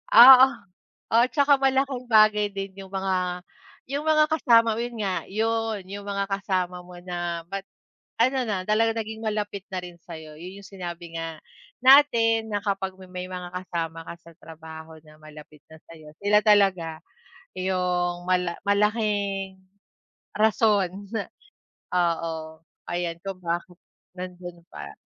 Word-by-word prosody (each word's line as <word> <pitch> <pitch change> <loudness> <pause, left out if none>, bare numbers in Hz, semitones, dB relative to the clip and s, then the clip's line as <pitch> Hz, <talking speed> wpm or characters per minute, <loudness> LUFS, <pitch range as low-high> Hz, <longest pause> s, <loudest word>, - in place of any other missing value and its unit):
Oo, 255 +3 +11 0.7
oo. 230 +1 +5
Tsaka 280 +1 +3
malaking 270 -2 0
bagay 215 -2 +5
din 195 -1 -6
yung 190 -1 -10
mga 185 -2 -2 0.5
yung 285 +2 -2
mga 305 -1 +5
kasama 230 -7 +4
mo. - - -4
Yun 240 0 -4
nga, 190 -2 0
yun 225 0 -1
yung 200 +1 -8
mga 200 0 -1
kasama 185 -2 -1
mo 180 0 -13
na 175 -2 -4
ba't 195 0 -5 0.5
ano 260 +3 +3
na 190 -3 -1
talaga, 225 +1 +2
naging 220 0 -5
malapit 210 -2 -2
na 190 - -3
rin 175 -1 -9
sa'yo. 160 -3 -10
Yun 185 +3 -9
yung 200 - -15
sinabi 175 -3 -8
nga 165 -1 -5 0.5
natin 230 -5 +5
na 205 - 0
kapag 195 -2 -2
ma 190 - -11
may 180 0 -5
mga 180 -1 -6
kasama 170 -3 -4
ka - - -7
sa 170 0 -16
trabaho 160 0 -11
na 155 0 -18
malapit 150 -1 -14
na 160 - -12
sa'yo. 155 -2 -14
Sila 210 +1 +5
talaga 195 -6 +3 0.6
yung 180 -1 -1
mala 180 -2 +1
malaking 200 -2 0 0.8
rason 210 -3 +3 0.2
na, 205 -4 -2 0.7
oo, 165 -2 -1 0.3
ayan, 175 -1 -2
kung 195 -1 -6
bakit 175 +1 -4 0.4
nandun 180 -1 -8
pa. 70 -1 -9
190 Hz, 145 wpm, -25 LUFS, 175-220 Hz, 0.8 s, Oo